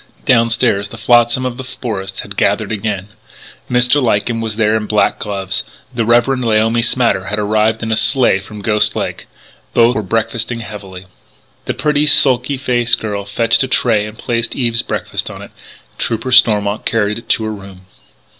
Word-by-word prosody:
Downstairs 115 -4 +2
the 115 - -11
flotsam 120 +2 +3
of 125 -1 -3
the 130 - -6
forest 115 -7 -5
had - - -9
gathered - - 0
again: 105 -2 -3 0.6
Mr. 125 +3 +3
Lyken 115 -1 0
was 110 -2 -3
there 110 -1 +2
in 110 -1 -2
black 105 -1 +1
gloves; 95 -2 -3 0.3
the 115 -2 -1
Reverend 120 +3 +2
Laomi 115 +1 +2
Smatter 115 -5 +1
had 105 +2 -1
arrived 110 +2 +1
in 110 - -2
a - - +3
sleigh 110 -2 +2
from 100 +1 -10
Ghost 105 0 +2
Lake. - - -4 0.5
Both 120 +1 +4
were 110 - 0
breakfasting 115 +3 -2
heavily. 95 -4 -9 0.6
The - - -2
pretty, 150 0 +1
sulky 135 -1 +3
faced 125 -3 +1
girl 105 -2 -4
fetched 115 +3 +1
a 130 - +1
tray 110 -5 +1
and 110 +1 -11
placed 115 -1 -2
Eve's 120 -3 +1
breakfast - - -4
on - - -9
it; - - -12 0.4
and - - -33
Trooper 115 +3 -2
Stormont 105 -4 +4
carried 105 -1 0
it 115 - -18
to 110 - +2
her 110 0 -3
room. 95 -2 -11
115 Hz, 175 wpm, -16 LUFS, 105-120 Hz, 0.6 s, Both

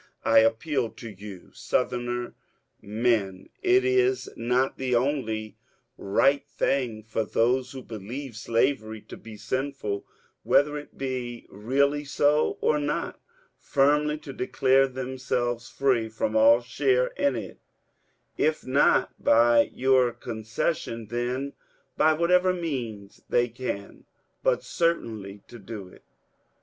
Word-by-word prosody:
I 115 0 +6
appeal 115 +3 +1
to 115 0 -10
you. 100 -2 -11
Southern 120 -1 -2 0.5
men, 105 -3 -1
is 385 0 +3
it - - -12
not 125 +3 0
the 130 -2 0
only 120 -5 -1 0.4
right 135 +8 +2
thing 125 -6 -1
for 110 +1 -2
those 125 +4 +1
who 130 -1 -8
believe 115 +4 -7
slavery 115 -1 0
to - - -11
be 110 -1 -11
sinful, 130 -5 -3 0.4
whether 145 +1 +3
it 145 0 -9
be 125 -3 -4
really 140 +8 +1
so 145 +1 +2
or 150 - +2
not, 145 0 -2 0.4
firmly 150 +2 +2
to 150 -3 -9
declare 135 +1 +2
themselves 125 -2 -3
free 125 -5 +1
from 110 0 -2
all 115 +2 +6
share 125 0 +1
in 140 -2 0
it, 115 - -7 0.8
if 155 0 +1
not 135 +3 +2
by 115 0 +5
your 130 -2 +3
concession, 115 0 -3
then 125 +4 -2 0.4
by 155 +1 +4
whatever 180 +3 +3
means 120 - -5
they 120 0 +3
can, 115 -4 -6 0.4
but - - +1
certainly 110 - -2
to 120 - -12
do 100 -3 -8
it? - - -18
125 Hz, 120 wpm, -26 LUFS, 110-140 Hz, 0.8 s, I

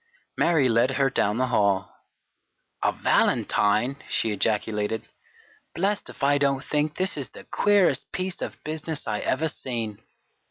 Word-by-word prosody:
Mary 160 -6 +3
led 115 +1 +3
her 135 -1 +2
down 105 -3 +1
the 130 - +2
hall. 100 -3 +1 0.9
"A - - +3
valentine!" 110 +6 +2
she 110 - +1
ejaculated. 105 +1 -1 0.7
"Blest 200 +4 0
if - - -10
I 145 +1 +4
don't 140 -1 +1
think 150 0 -1
this 185 -2 -1
is 135 -4 -4
the - - -12
queerest 205 -3 +2
piece 185 -1 -3
of - - -6
business 155 -1 -4
I 105 -1 -1
ever 160 +5 0
seen!" 115 -8 -4
135 Hz, 145 wpm, -25 LUFS, 110-155 Hz, 0.9 s, I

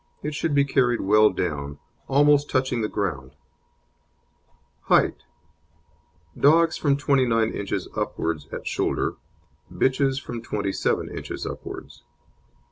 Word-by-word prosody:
It 150 +1 -3
should 150 0 -1
be 140 0 +4
carried 125 -3 +2
well 105 +2 +5
down, 70 -4 -3 0.3
almost 145 +1 +4
touching 130 -2 0
the 110 - 0
ground. 70 -11 -3 1.5
HEIGHT - - +2 1.1
Dogs 165 +3 +4
from 140 -2 +1
29 125 -5 +2
inches 100 -1 -3
upwards 80 -3 -2
at - - -6
shoulder, - - -1 0.5
bitches 135 0 +1
from 120 -4 -7
27 100 -4 -2
inches - - -6
upwards. - - -8
120 Hz, 110 wpm, -24 LUFS, 100-140 Hz, 1.5 s, well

